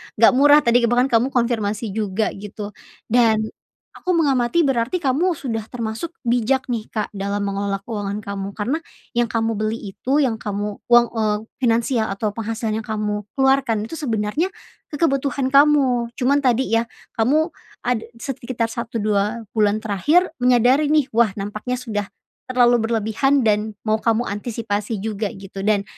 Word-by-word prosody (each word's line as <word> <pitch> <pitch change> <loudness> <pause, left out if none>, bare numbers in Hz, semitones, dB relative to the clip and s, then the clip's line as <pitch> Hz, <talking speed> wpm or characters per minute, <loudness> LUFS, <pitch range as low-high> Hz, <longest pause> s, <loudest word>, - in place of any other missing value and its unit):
enggak 225 +3 +6
murah 290 +2 +7
tadi, 240 -1 +3
bahkan 245 +2 +3
kamu 230 +2 +4
konfirmasi 225 -3 0
juga, 215 0 -1
gitu. 205 +1 -7 0.4
Dan 225 -2 +3 0.5
aku 360 -1 -2
mengamati 285 0 +2
berarti 260 +1 0
kamu 315 +7 +2
sudah 240 -6 -3
termasuk 235 +8 -5
bijak 245 +2 +1
nih, 225 -3 -3
Kak, 215 -2 -3
dalam 200 0 -3
mengelola 200 0 -2
keuangan 205 -3 -4
kamu, 200 0 -5
karena 250 +10 -1 0.3
yang 240 -1 +1
kamu 225 -1 -1
beli 215 +1 0 0.2
itu, 275 +8 +1
yang 225 -4 0
kamu 205 0 -4
uang 240 0 +6
eee, 210 -1 +1 0.2
finansial 230 -1 +1
atau 210 +1 -1
penghasilan 225 0 -3
yang 220 - -9
kamu 210 -1 -2
keluarkan 265 -5 +2
itu 270 +9 -7
sebenarnya, 230 - 0 0.5
kebutuhan 275 -3 0
kamu. 275 -4 +4
Cuman 280 +2 +2
tadi 255 -2 +1
ya, 230 - -3 0.3
kamu 305 +9 +2 0.3
ada 245 -3 -1 0.2
sekitar 235 -3 -3
1, 230 -2 -4
2, 210 +2 0
bulan 215 -1 +1
terakhir 295 - +2
menyadari 250 +4 +4
nih, 300 -3 +2
"Wah, 225 -3 +2
nampaknya 215 +5 -4
sudah 220 -5 -3 0.4
terlalu 245 -2 +4
berlebihan 230 +4 +1
dan 210 0 +1
mau 215 0 +2
kamu 230 +1 +2
antisipasi 210 0 -3
juga", 215 0 -2
gitu. 195 0 -10
Dan 210 -2 +2
230 Hz, 150 wpm, -21 LUFS, 210-260 Hz, 0.5 s, murah